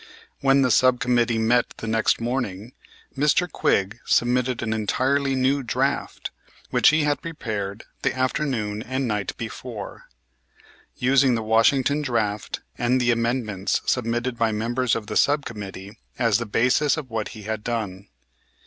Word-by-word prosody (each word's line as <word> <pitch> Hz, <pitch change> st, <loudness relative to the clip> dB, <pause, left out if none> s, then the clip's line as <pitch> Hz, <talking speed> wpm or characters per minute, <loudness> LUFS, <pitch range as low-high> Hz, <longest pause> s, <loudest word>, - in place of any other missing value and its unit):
When 135 Hz, 0 st, +4 dB
the 125 Hz, -, +2 dB
sub 130 Hz, +1 st, +4 dB
committee 120 Hz, -2 st, +2 dB
met 120 Hz, +2 st, +2 dB
the -, -, -7 dB
next 110 Hz, 0 st, +1 dB
morning 115 Hz, -3 st, -3 dB, 0.4 s
Mr. 150 Hz, +6 st, +2 dB
Quigg 100 Hz, -, 0 dB
submitted 125 Hz, 0 st, +1 dB
an 110 Hz, -1 st, -1 dB
entirely 135 Hz, +5 st, 0 dB
new 135 Hz, +2 st, +2 dB
draft, 120 Hz, -, -2 dB, 0.4 s
which -, -, +5 dB
he 155 Hz, 0 st, +2 dB
had 145 Hz, 0 st, 0 dB
prepared 110 Hz, -10 st, -5 dB, 0.2 s
the -, -, +1 dB
afternoon 130 Hz, -6 st, -1 dB
and 130 Hz, +2 st, -2 dB
night 105 Hz, -2 st, -2 dB
before, 115 Hz, -2 st, -7 dB, 0.9 s
using 130 Hz, 0 st, +3 dB
the 115 Hz, -, -2 dB
Washington 130 Hz, +6 st, +3 dB
draft 110 Hz, -7 st, -2 dB, 0.2 s
and 125 Hz, +2 st, +2 dB
the 125 Hz, -1 st, +3 dB
amendments 115 Hz, -4 st, 0 dB
submitted 120 Hz, 0 st, -1 dB
by 115 Hz, -1 st, +2 dB
members 115 Hz, +3 st, 0 dB
of 115 Hz, -, -4 dB
the -, -, -6 dB
sub 145 Hz, 0 st, +3 dB
committee 100 Hz, -1 st, -8 dB, 0.2 s
as 115 Hz, -4 st, +2 dB
the 115 Hz, -, -4 dB
basis 130 Hz, +7 st, +2 dB
of 135 Hz, -6 st, -6 dB
what 110 Hz, -2 st, -2 dB
he 105 Hz, -, -9 dB
had 110 Hz, 0 st, -4 dB
done. 105 Hz, -5 st, -4 dB
120 Hz, 150 wpm, -24 LUFS, 110-130 Hz, 0.9 s, which